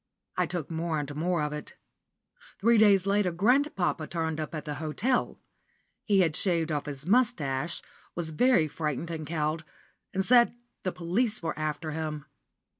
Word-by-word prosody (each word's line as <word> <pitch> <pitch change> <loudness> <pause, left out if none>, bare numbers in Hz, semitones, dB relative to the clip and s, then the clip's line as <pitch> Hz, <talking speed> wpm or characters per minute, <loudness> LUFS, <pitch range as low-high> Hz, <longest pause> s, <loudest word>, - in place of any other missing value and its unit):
I - - +1
took 170 -4 -4
more 165 0 -1
and 145 -1 -4
more 170 +1 0
of 150 0 -2
it. 150 - -7 0.8
Three 230 +2 +4
days 200 -3 +5
later 200 -2 +2
grandpapa 195 - +1
turned 160 -2 -2
up 155 +1 -4
at 155 - -5
the 150 - -3
hotel. 215 +12 0 0.7
He 200 -3 +4
had 160 -4 +2
shaved 170 -4 +1
off 150 -1 -2
his 140 0 -6
moustache, 175 - +1 0.3
was 165 -2 -2
very 180 -1 +4
frightened 155 +2 -3
and 155 -2 -5
cowed, 155 0 -1 0.5
and 190 0 0
said 240 0 +5 0.3
the 185 - -1
police 185 +5 -1
were 165 - -1
after 155 +1 -3
him. 155 -2 -4
165 Hz, 160 wpm, -28 LUFS, 155-195 Hz, 0.8 s, days